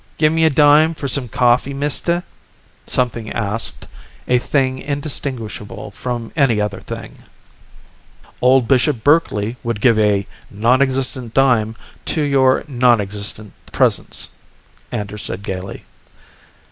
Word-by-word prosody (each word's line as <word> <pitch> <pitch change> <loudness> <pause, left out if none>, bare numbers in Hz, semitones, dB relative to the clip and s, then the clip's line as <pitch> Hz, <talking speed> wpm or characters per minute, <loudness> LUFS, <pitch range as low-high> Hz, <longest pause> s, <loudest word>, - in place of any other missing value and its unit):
"Give 155 0 +3
me 160 0 +3
a - - +5
dime 150 +2 +5
for 140 - -4
some 135 -1 -2
coffee, 125 +4 +2
mister?" 150 +5 0 0.6
something 115 -3 -1
asked, 115 0 -3 0.4
a 125 0 +3
thing 130 0 0
indistinguishable 135 -8 -4
from 120 +2 -5
any 135 -8 +3
other 105 -2 -2
thing. - - -9 1.2
"Old 125 -1 +4
Bishop 125 -3 +2
Berkeley 125 -7 +2
would 115 -3 -3
give 115 -1 +4
a 105 -2 +2 0.2
nonexistent 130 +2 0
dime 120 -5 +3 0.3
to 160 - -1
your 135 -2 +3
nonexistent 105 -5 0 0.2
presence," - - 0 0.6
Anders 105 0 -4
said 100 - -5
gaily. 95 0 -6
125 Hz, 115 wpm, -18 LUFS, 110-140 Hz, 1.2 s, a